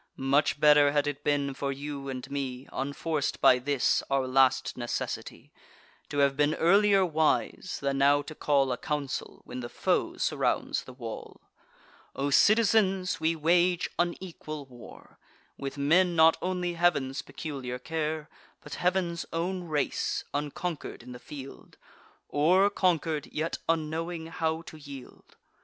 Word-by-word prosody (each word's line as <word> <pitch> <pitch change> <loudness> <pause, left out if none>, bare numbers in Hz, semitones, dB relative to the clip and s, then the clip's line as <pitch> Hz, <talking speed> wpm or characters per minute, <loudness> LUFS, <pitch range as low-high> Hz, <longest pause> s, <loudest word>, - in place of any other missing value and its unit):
Much 140 +2 +2
better 145 -1 +6
had 145 -1 +2
it 145 0 -4
been 140 -1 0
for 140 +1 -3
you 140 0 -6
and 130 +1 -6
me, 135 -2 -4
Unforc'd 145 +2 -2
by 125 - +6
this 135 0 +1
our 135 -1 +1
last 130 0 +3
necessity, 120 -1 -5 0.6
To 145 - -4
have 140 -1 +3
been 150 +2 +2
earlier 195 +2 +4
wise, 160 +2 0
than 140 0 -1
now 145 +1 +4
to 150 - -8
call 140 -3 +1
A 125 - -1
council, 145 -3 -4
when - - -7
the 120 -1 -6
foe - - 0
surrounds - - 0
the - - -10
wall. 115 -3 -8 0.7
O 140 +1 -1
citizens, 200 -1 +3
we 160 +1 +1
wage 175 +3 +2
unequal 170 -4 -3
war, 125 -3 -14 0.4
With 140 0 -6
men 170 +5 +3
not 160 0 +6
only 180 -1 -1
Heav'n's 145 -6 +1
peculiar 135 -6 -6
care, 155 +2 -3 0.4
But - - -9
Heav'n's 180 -2 0
own 180 +2 -2
race; 150 -3 -1
unconquer'd 150 -1 -4
in 125 - -10
the 125 - -9
field, 135 -1 -11 0.5
Or, 185 +7 +3
conquer'd, 165 -6 0
yet 155 +2 -2
unknowing 165 +1 -1
how 160 0 -2
to 160 - -11
yield. 140 -3 -12
150 Hz, 140 wpm, -28 LUFS, 140-170 Hz, 0.7 s, better